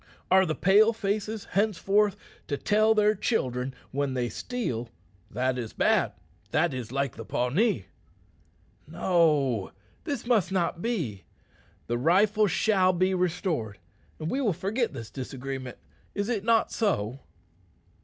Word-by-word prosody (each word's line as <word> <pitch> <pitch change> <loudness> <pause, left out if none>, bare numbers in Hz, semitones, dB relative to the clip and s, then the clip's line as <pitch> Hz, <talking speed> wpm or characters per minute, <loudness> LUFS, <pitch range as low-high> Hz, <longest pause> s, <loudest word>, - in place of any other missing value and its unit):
Are 190 0 +6
the 155 - -1
Pale 210 +4 +5
faces 215 0 -2
henceforth 205 0 +2 0.3
to 145 - -2
tell 215 +4 +3
their 210 0 +4
children 130 - -1 0.2
when 140 -1 -1
they 120 -1 -1
steal, 125 - -4 0.4
'That 125 +2 -1
is 115 -3 -5
bad; - - +2 0.4
that 160 -1 +1
is 125 -3 -5
like 135 -1 -1
the 115 - -7
Pawnee?' 125 - 0 1.0
No; 150 - +2 0.3
this 285 -6 -4
must 220 -7 +2
not 175 -2 0
be. 160 - -3 0.6
The 120 0 -2
rifle 205 - +4
shall 190 0 +3
be 185 +2 +2
restored, 175 - -1 0.4
and 155 +1 -4
we 275 - 0
will 215 -8 +2
forget 205 +8 -1
this 115 -6 -8
disagreement. 130 -1 -6 0.4
Is 205 +2 -1
it 220 -5 -1
not 230 0 +3
so?" 135 - -1
180 Hz, 135 wpm, -27 LUFS, 130-210 Hz, 1.0 s, Are